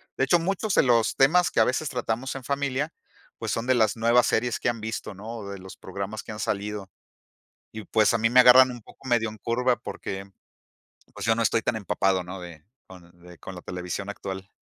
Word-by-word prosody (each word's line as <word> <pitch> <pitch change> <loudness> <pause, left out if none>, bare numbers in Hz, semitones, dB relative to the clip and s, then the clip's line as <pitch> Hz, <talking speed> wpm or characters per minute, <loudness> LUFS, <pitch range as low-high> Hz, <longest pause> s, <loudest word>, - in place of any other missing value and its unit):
De - - 0
hecho, 175 - +4
muchos 195 +3 -1
de - - +5
los 115 -3 +3
temas 175 +6 +4
que - - -1
a - - +7
veces 135 +5 -1
tratamos 125 +1 -3
en 135 - -7
familia, 140 +2 -2 0.5
pues, - - -3
son 115 +1 -2
de 130 - +3
las 110 -2 +2
nuevas 120 +2 +4
series 120 +1 0
que - - +1
han 115 -1 -3
visto, 110 -1 -5
¿no? 110 +4 -7
O 100 -2 -7
de 100 - -6
los 95 0 -11
programas 100 +3 -6
que - - -8
han 105 - -7
salido. 100 -1 -3 0.8
Y, 110 -1 -7
pues, 110 +3 +3
a - - +2
mí 115 +1 +2
me 125 +1 +7
agarran 130 +1 +8
un 120 -1 -8
poco 130 - -16
medio 120 -3 +2
en 110 - -8
curva, 125 +2 +1
porque, 95 0 -6 0.9
pues, - - -6
yo 115 0 +3
no 115 - +1
estoy 115 0 +2
tan 115 - -1
empapado, 95 -3 0
¿no? 95 +1 -8
De 85 -3 -11 0.2
con 90 -2 -15
de 90 -1 -14
con 95 - -9
la 90 - -10
televisión 90 +2 -5
actual. 95 -1 -7
110 Hz, 225 wpm, -26 LUFS, 100-125 Hz, 0.9 s, agarran